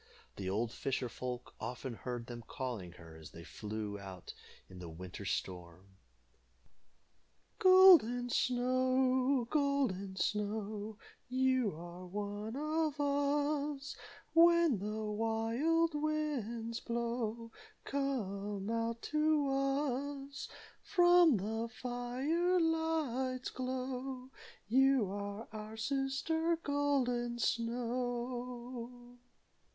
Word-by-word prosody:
The 95 -2 -4
old 110 +4 0
fisher 130 0 -2
folk 125 +1 -6
often 125 +1 -5
heard 120 0 -5
them 120 -1 -8
calling 120 -10 -5
her 80 -2 -13
as 80 -1 -11
they 85 - -11
flew 105 +1 -5
about 95 -2 -9 0.3
in 95 - -12
the 85 -2 -7
winter 90 +4 -8
storm: 90 -1 -4 1.7
"Golden 355 -11 +7
Snow! 255 +1 +2
Golden 270 -10 +1
Snow! 210 +1 -2 0.3
You 255 -6 +2
are 175 +2 -9
one 205 +3 -4
of 305 +1 -1
us. 285 0 0 0.4
When 335 - +6
the 215 +2 -3
wild 230 +10 +1
winds 280 -7 -2
blow, 235 -1 -3 0.3
Come 205 -7 -2
out 230 0 -2
to 305 -2 +2
us 275 0 -1 0.3
From 350 - +5
the 220 +4 -2
fire 260 +10 0
light's 310 -6 0
glow. 255 0 -4 0.4
You 260 -3 +4
are 205 +2 -5
our 215 0 -7
sister, 275 +7 0
Golden 275 -6 0
Snow." 245 +1 -3
245 Hz, 95 wpm, -34 LUFS, 205-280 Hz, 1.7 s, Golden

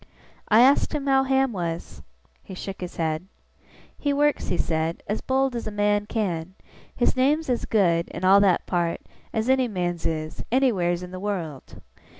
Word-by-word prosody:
I 220 +2 +6
asked 270 +5 +4
him 285 -2 -3
how 270 -1 +3
Ham 265 -2 +2
was? 170 -3 -5 0.4
He 190 - -10
shook 195 +1 -7
his 180 - -6
head. 160 +2 -2 0.7
'He 285 - 0
works,' 295 +1 +1
he 175 - -1
said, 160 0 -1
'as 210 - -3
bold 265 -1 0
as 235 - -4
a - - -4
man 205 0 +1
can. 185 -6 -3 0.4
His 245 - +1
name's 280 +3 +2
as 240 - -1
good, 175 -6 +2
in 185 - -5
all 195 +2 +7
that 195 -4 +3
part, 170 -2 -1 0.3
as 220 +1 -1
any 260 -1 +3
man's 175 -5 -2
is, 155 -1 -4
anywheres 185 -10 +2
in 180 - -8
the 185 - -6
wureld. 175 -9 -5
200 Hz, 175 wpm, -24 LUFS, 175-255 Hz, 0.7 s, all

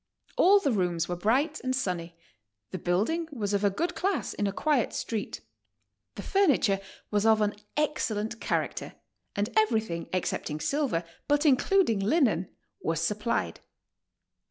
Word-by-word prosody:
All 400 +3 +6
the 285 -8 0
rooms 175 -5 0
were 175 - -2
bright 260 - +1
and 255 0 0
sunny. 175 -8 -3 0.5
The 185 - -4
building 215 - 0
was 210 -7 -2
of 200 0 +1
a 200 - +5
good 340 - -2
class 385 +2 -1
in 205 - -1
a - - 0
quiet 275 +2 +1
street. 220 -3 -4 0.7
The 200 - -6
furniture 285 - +3 0.3
was 205 -1 +2
of 220 -1 +5
an 210 -1 +1 0.2
excellent 225 -7 -1
character, - - -2 0.4
and 205 +2 -1
everything 220 - +1
excepting 165 -4 -2
silver, 235 - 0 0.2
but 290 +1 +2
iii 290 - +7
cluding 290 - +2
linen, 215 - +2 0.3
was 165 -1 -1
supplied. 210 +7 -1
220 Hz, 145 wpm, -28 LUFS, 190-295 Hz, 0.7 s, iii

